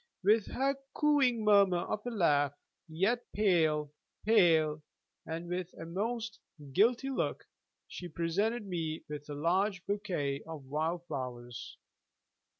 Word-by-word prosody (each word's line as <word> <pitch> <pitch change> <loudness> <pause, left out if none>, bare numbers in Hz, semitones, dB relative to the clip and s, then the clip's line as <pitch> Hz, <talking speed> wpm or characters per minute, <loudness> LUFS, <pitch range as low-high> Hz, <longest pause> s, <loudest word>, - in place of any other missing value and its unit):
With 210 +2 +4
her 275 +2 0 0.2
cooing 270 -7 +3
murmur 200 -3 +6
of 210 +4 -3
a - - +1
laugh, 145 - +2 0.3
yet 195 +10 +1
pale, 160 -7 +2 0.3
pale, 165 -8 +4 0.5
and 165 +2 -4
with 180 0 -3
a - - -6
most 220 +5 -3 0.3
guilty 235 - +3
look, 265 - -2 0.4
she 180 - -7
presented 200 +8 -1
me 165 -4 -3
a 150 0 -6
large 185 +5 +1
bouquet 175 -9 -2
of 155 -4 -7
wild 160 +5 -2
flowers. 125 -6 -6
180 Hz, 120 wpm, -32 LUFS, 155-215 Hz, 0.5 s, murmur